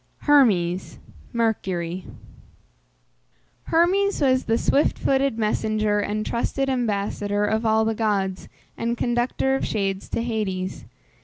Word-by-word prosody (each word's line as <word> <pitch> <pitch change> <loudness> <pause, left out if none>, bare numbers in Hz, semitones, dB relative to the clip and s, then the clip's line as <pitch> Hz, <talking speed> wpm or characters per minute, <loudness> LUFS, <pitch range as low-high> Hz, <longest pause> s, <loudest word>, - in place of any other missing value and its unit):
HERMES 195 - +3 0.3
(MERCURY). 190 -7 -1 1.6
Hermes 380 +5 +2
was 260 -2 +2
the 225 +1 +2
swift 285 +4 +2
footed 270 -3 +1
messenger, 215 -1 0
and 210 +1 -2
trusted 270 +3 -1
ambassador 205 -3 -1
of 220 +2 0
all 220 0 +3
the 225 - +1
gods, 200 -4 -1 0.3
and 235 +1 -2
conductor 240 +3 0
of 270 - -1
shades 195 -2 -2
to 230 - -2
Hades. 195 -5 -3
220 Hz, 110 wpm, -23 LUFS, 205-250 Hz, 1.6 s, HERMES